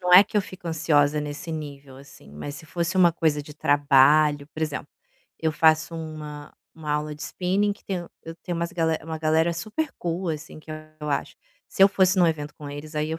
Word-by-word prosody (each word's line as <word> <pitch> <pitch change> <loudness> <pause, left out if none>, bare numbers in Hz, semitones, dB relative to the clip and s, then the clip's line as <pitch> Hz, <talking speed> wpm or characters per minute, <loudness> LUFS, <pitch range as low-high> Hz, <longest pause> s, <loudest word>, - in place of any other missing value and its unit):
...não 180 0 +4
é 190 - +11
que 210 - -5
eu 210 - +5
fico 185 -2 -8
ansiosa 150 -2 +2
nesse 150 +4 -6
nível, 145 -4 -7
assim, 140 - -15
mas 110 - -6
se 155 - -10
fosse 170 +3 -2
uma 175 -2 +6
coisa 155 -3 +1
de 150 - -11
trabalho, 145 0 +4
por 160 - -4
exemplo, 150 -2 -3 0.5
eu 160 - +1
faço 160 +1 +3
uma 155 -2 -7 0.2
uma 155 -2 -4
aula 150 0 -1
de 150 - -9
spinning 195 +3 0
que 200 - -16
tem 190 - -2 0.3
eu 165 - -8
tenho 175 0 -5
umas 170 0 -2 0.3
uma 160 0 -5
galera 160 +2 +2
super 215 - -3
cool, 175 +1 -2
assim, 155 0 -5
que 155 - -13 0.3
eu 150 -1 -3
acho, - - -2 0.3
se - - +2
eu 195 - +9
fosse 190 -1 +3
em - - +6
um 175 - +6
evento 150 -2 -2
com 145 -1 -9
eles 150 +2 -8
aí 150 0 0
eu 160 +1 -3
155 Hz, 220 wpm, -25 LUFS, 150-170 Hz, 0.5 s, é